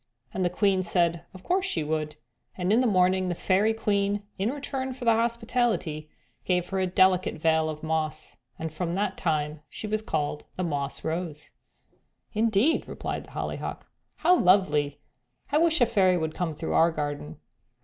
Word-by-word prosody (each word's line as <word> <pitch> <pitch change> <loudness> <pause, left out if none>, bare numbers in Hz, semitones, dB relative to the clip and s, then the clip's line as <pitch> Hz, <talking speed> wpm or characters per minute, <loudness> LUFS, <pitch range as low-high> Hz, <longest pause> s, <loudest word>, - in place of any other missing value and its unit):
and 190 - -1
the 175 - +2
Queen 190 +1 +2
said 170 -2 +1
of 185 0 -13
course 370 +1 +1
she 175 - 0
would, 155 0 -2 0.4
and 185 +2 +1
in 235 - +5
the 255 - +2
morning 185 -2 +3
the 175 - -1
Fairy 195 +5 +2
Queen 205 -2 0 0.2
in 200 +4 +1
return 265 -1 -3
for 255 -1 -7
the 230 - +6
hospitality 225 -9 0 0.3
gave 180 -1 0
her 190 - -1
a 185 - +1
delicate 185 0 +3
veil 160 0 +2
of 155 0 -6
moss, 155 -1 -2 0.2
and 160 -1 -5
from 170 +1 -2
that 195 -1 -1
time 150 -2 -1
she - - -6
was 215 0 -1
called 150 -7 -2
the 185 - -2
'Moss 145 -4 -3
Rose.'" 160 -2 -4 0.8
"Indeed!" 225 +7 +2
replied - - -5
the - - -17
Hollyhock. - - -4 0.3
"How 360 - +4
lovely; 150 -7 +3 0.5
I 295 - +4
wish 330 -1 +3
a - - +8
fairy 195 -6 +3
would 160 -2 -2
come 165 -3 -2
through 160 - -3
our 165 - +5
garden." 145 - -4
180 Hz, 175 wpm, -27 LUFS, 160-215 Hz, 0.8 s, a